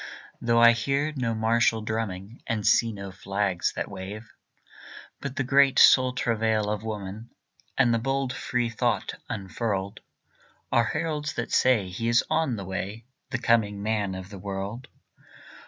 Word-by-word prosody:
Though 115 0 +3
I 120 0 +8
hear 140 +6 0
no 120 -4 -1
martial 110 0 +2
drumming, 110 -1 -4
And 110 -4 -2
see 115 -1 +4
no 100 -2 -7
flags 100 -2 -1
that - - -3
wave. 100 +3 -8 0.9
But 140 -1 -5
the 135 - 0
great 135 +1 +4
soul 130 -1 +7
travail 110 -3 0
of 105 -1 -2
woman, 105 +1 -6 0.5
And 120 -3 +4
the 115 - +2
bold 135 +1 -1
free 120 -2 -1
thought 115 - -1 0.2
unfurled, 100 0 -3 0.7
Are 120 - +4
heralds 150 +2 -2
that - - -4
say 125 -7 +3
he 115 +6 -2
is 120 0 +4
on 160 -6 +1
the 100 -3 -6
way 100 +4 -5 0.2
The 125 - -1
coming 110 -4 +1
man 105 -3 -1
of 95 +1 -8
the 100 - -8
world. 100 +5 -5
115 Hz, 155 wpm, -26 LUFS, 100-125 Hz, 0.9 s, I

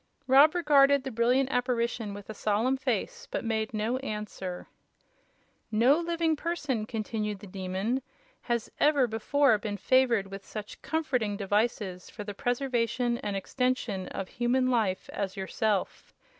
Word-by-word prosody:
Rob 275 +5 +6
regarded 280 -5 +5
the 265 - -4
brilliant 250 +4 +2
apparition 235 -4 -1
with 205 -1 -10
a 220 - -6
solemn 215 +5 +1
face, 475 - -2
but - - -3
made 220 -1 -1
no 220 +3 -1
answer. 210 -7 -5 1.1
"No 245 +8 +4
living 335 -1 0
person," 290 -9 -2
continued 215 -2 -3
the 195 - -12
Demon, 195 +6 -2 0.4
"has 235 -2 -2
ever 290 -3 +4
before 235 +2 +2
been 205 0 -4
favored 245 -4 +3
with 195 0 -7
such 210 0 -8
comforting 250 -10 -1
devices 205 -2 -1
for 210 - -7
the 205 0 -6
preservation 245 0 0
and 205 -1 -3
extension 225 -2 -1
of 195 - -5
human 255 +2 +1
life 210 -6 0
as 200 0 -3
yourself. 195 +1 -2
235 Hz, 140 wpm, -29 LUFS, 205-265 Hz, 1.1 s, Rob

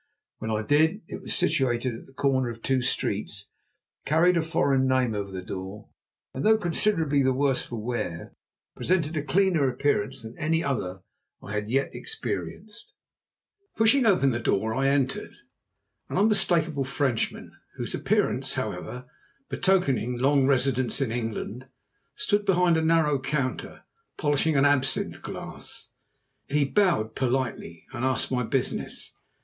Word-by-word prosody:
When 110 - -4
I 110 -1 0
did 160 - +2
it - - -7
was - - -3
situated 130 -7 +1
at 115 - -9
the 135 - -19
corner 130 -2 +1
of 115 -1 -9
two 130 -1 +1
streets, 125 - -2 0.5
carried 165 +4 +3
a 170 - +3
foreign 140 -5 +1
name 130 -3 +2
over 100 -1 -3
the 95 -1 -6
door, 95 +3 -7 0.4
and, 130 - -4
though 220 0 +5
considerably 165 -6 +2
the 130 -1 +2
worse 135 -1 +2
for 120 - -7
wear, 110 -7 -4 0.4
presented 170 -3 0
a 155 - 0
cleaner 160 -1 +2
appearance 125 -4 -1
than 110 +1 -9
any 160 +1 +1
other 95 - -3 0.4
I 105 - -7
had 105 0 -1
as - - -10
yet 135 +3 +1
experienced. 230 - -6 0.8
Pushing 225 +5 +4
the 140 - +3
door 110 +3 +1
open 135 - 0
I - - +4
entered. 135 -1 0 0.7
An - - -2
unmistakable 175 -8 +3
Frenchman, 130 -3 -1 0.2
whose - - -4
appearance, - - 0
however, 125 +1 -4 0.4
betokened 135 -10 +1
long 135 +1 +3
residence 130 -3 +1
in 135 -5 0
England, 115 +1 -4 0.5
stood 205 -1 +1
behind 180 -3 +3
a 160 - +2
narrow 160 -3 +3
counter 130 -1 -3 0.3
polishing 145 +1 +1
an 135 0 +4
absinthe 145 -2 +1
glass. - - -8 0.6
He 145 0 +2
bowed 140 - +2
politely 125 -10 -2
and 125 -1 -4
asked 130 0 0
my 125 -1 +1
business. 125 +1 -2
135 Hz, 145 wpm, -26 LUFS, 120-160 Hz, 0.8 s, though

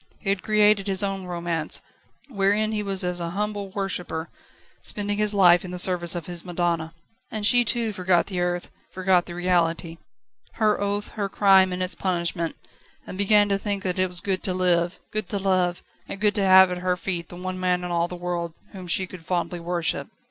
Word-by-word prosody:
He 195 - -4
had 195 -1 0
created 210 -1 +3
his 195 0 0
own 195 -2 -3
romance, 170 -3 -3 0.5
wherein 210 -2 +1
he 215 -1 -1
was 195 -2 -2
as 180 0 -2
a 170 -1 -3
humble 205 -1 -2
worshipper, 185 -4 -4 0.5
spending 205 0 +1
his 210 -1 +2
life 180 -2 +5
in 185 - -7
the 180 - -5
service 175 -1 +2
of 170 -3 -4
his 175 -2 -3
madonna. 170 -2 -2 0.3
And 215 -1 -3
she 245 +3 +6
too 230 -1 -1
forgot 180 -2 +2
the 185 -3 -4
earth, 175 0 -2 0.2
forgot 185 -1 +1
the 175 - -7
reality, 170 -2 0 0.5
her 215 -3 +1
oath, 205 +1 -1
her 200 -2 -3
crime 190 -2 +5
and 180 0 -2
its 180 -1 -1
punishment, 170 -2 -2 0.5
and - - -8
began 205 +1 +4
to 195 0 +1
think 200 -1 -3
that 185 0 -2
it 185 - +3
was 180 -1 +2
good 190 0 -1
to 185 - -1
live, 175 -1 +1
good 215 0 -3
to 205 - -2
love, 185 -2 0 0.2
and 195 - -6
good 210 0 +2
to 205 - 0
have 190 -1 +7
at 180 - -3
her 180 0 0
feet 170 -1 -4
the - - -10
one 185 +1 -5
man 180 -1 0
in 180 - -4
all 170 0 +1
the 180 - -7
world 175 -2 -4 0.2
whom 185 -2 -9
she 190 +2 +2
could 180 -2 -11
fondly 175 +1 -2
worship. 170 -1 -2
185 Hz, 205 wpm, -24 LUFS, 175-200 Hz, 0.5 s, have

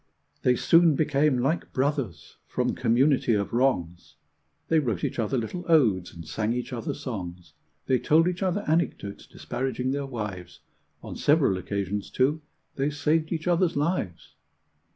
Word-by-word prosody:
They 125 - +3
soon 165 +3 +5
became 150 -2 +2
like 135 +7 -1
brothers 135 - -2
from - - -1
community 125 0 +2
of 100 0 -2
wrongs; 90 -10 0 0.5
They 160 - +3
wrote 115 - -2
each - - -2
other 115 +4 0
little 125 +10 -4
odes 105 - +3
and 85 -2 -11
sang 110 +7 -1
each 125 +1 -4
other 115 -2 -3
songs; 90 - -7 0.3
They 130 -1 +2
told 165 +3 +4
each 180 +1 -2
other 190 +1 0
anecdotes 155 -10 -1
disparaging 130 0 -3
their 140 0 -2
wives; 105 -8 -6 0.4
On - - -7
several 145 - +3
occasions, 100 +2 -3
too, 145 +5 +1 0.4
they 140 +1 +1
saved 155 +2 0
each 165 0 -3
other's 175 0 +2
lives. 145 - -2
130 Hz, 150 wpm, -26 LUFS, 105-155 Hz, 0.5 s, soon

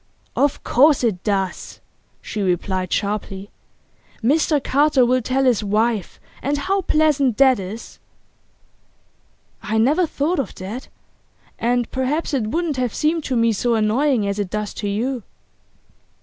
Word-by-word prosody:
'Of 285 0 +1
course 280 +2 +4
it 200 -6 0
does,' 195 -3 -2 0.4
she 215 - -4
replied 185 0 -1
sharply. 200 -1 -3 0.7
'Mr 295 +2 +2
Carter 285 -2 +3
will 255 +1 +2
tell 260 +3 0
his 245 -5 +2
wife, 215 0 0 0.2
and 285 +2 -1
how 385 +7 0
pleasant 300 - +2
that 265 -4 +5
is?' 195 +5 -8 1.6
'I 220 +1 -2
never 295 +10 +3
thought 305 +4 -1
of 275 - -3
that. 205 +8 -7 0.7
And 240 0 0
perhaps 275 +5 -1
it 245 -6 0
wouldn't 320 +3 -1
have 250 -3 -1
seemed 315 +1 0
to 260 - -1
me 230 -1 +3
so 235 +3 0
annoying 225 +2 +2
as 200 +1 -2
it 200 -3 -2
does 210 +1 -3
to 205 - -2
you. 240 +5 -2
245 Hz, 140 wpm, -21 LUFS, 210-285 Hz, 1.6 s, that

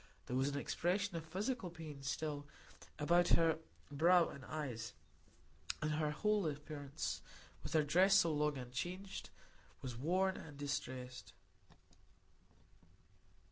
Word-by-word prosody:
There 125 - -3
was 135 +2 +3
an 145 - -2
expression 185 +6 0
of 165 -1 -4
physical 205 +4 -2
pain 160 -4 -8
still 145 0 -2 0.5
about 175 +4 +4
her 165 -1 +3 0.3
brow 170 +4 +5
and 140 - -9
eyes, 125 -7 -4 0.9
and 155 0 0
her 150 0 +1
whole 210 +4 +2
appearance, 145 -1 -4 0.4
with - - -5
her 155 -1 +5
dress 185 +7 +5
so 170 -4 +6
long 150 -1 +1
unchanged, 175 +10 -4 0.5
was 125 -3 -4
worn 185 +9 +2
and 150 -3 -9
distressed. 130 -3 -4
155 Hz, 120 wpm, -38 LUFS, 140-175 Hz, 0.9 s, so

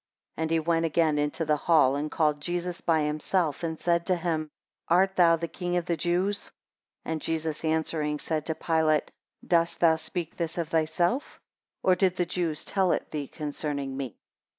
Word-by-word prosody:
6 - - -62
And 160 0 -1
he 165 0 +2
went 165 +1 +1
again 160 -2 +2
into 150 +3 -1
the 150 0 +3
hall, 145 -4 +4
and 150 +2 -2
called 150 -2 +1
Jesus 175 +1 -3
by 160 -2 +2
himself, 155 +2 0
and 160 -1 -3
said 170 -1 +2
to 185 - +3
him, 165 -3 -2 0.4
Art 190 +3 +3
thou 170 -2 +6
the 170 +1 -3
king 175 +1 -2
of 175 - -1
the 175 - 0
Jews? 180 +5 0
7 - - -13 0.5
And 160 -1 -3
Jesus 160 -1 -2
answering, 155 -1 0
said 155 0 -3
to 160 - -1
Pilate, 160 -2 +1 0.3
Dost 170 -1 +2
thou 165 -2 +5
speak 165 +1 -5
this 165 -1 -3
of 165 -2 -2
thyself, 165 - 0 0.4
or 185 - +5
did 185 0 +2
the 180 - 0
Jews 170 -3 -2
tell 190 -3 +1
it - - -3
thee 145 -2 -3
concerning 145 -2 -4
me? 135 -6 -5
165 Hz, 190 wpm, -27 LUFS, 155-175 Hz, 0.5 s, thou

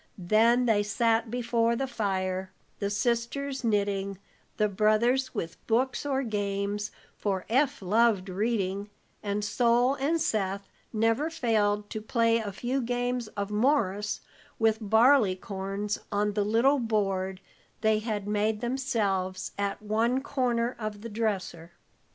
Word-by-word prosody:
Then 225 +6 +3
they 220 -3 +3
sat 225 +2 +1
before 235 -1 +1
the 270 - -1
fire, 190 -6 -2 0.3
the 200 - -1
sisters 240 +6 -1
knitting, 200 -3 0 0.4
the 215 - +3
brothers 220 +6 +2
with 165 -5 -4
books 250 +4 +1
or 270 -1 0
games, 205 -2 -2 0.3
for 195 -3 -2
Eph 270 -1 +1
loved 210 0 +3
reading, 200 0 -1 0.3
and 205 0 -2
Sol 240 +3 +3
and 285 +4 0
Seth 200 -6 -1 0.2
never 225 +7 +1
failed 215 -9 +1
to 215 - -4
play 230 +1 +2
a 210 -3 -4
few 250 +7 -2
games 245 0 -1
of 200 0 -2
Morris 210 -4 +1 0.4
with 220 -1 +2
barley 220 -1 +5
corns, 195 +1 -4
on 210 0 +1
the 205 0 +1
little 240 +7 +3
board 195 -5 -1 0.4
they 220 -1 +3
had 210 -2 -3
made 210 +1 0
themselves 210 -7 -1
at 200 +1 -3
one 225 +4 +1
corner 245 -4 0
of 215 -2 -5
the 230 - -6
dresser. 195 -6 -3
215 Hz, 135 wpm, -28 LUFS, 200-240 Hz, 0.4 s, barley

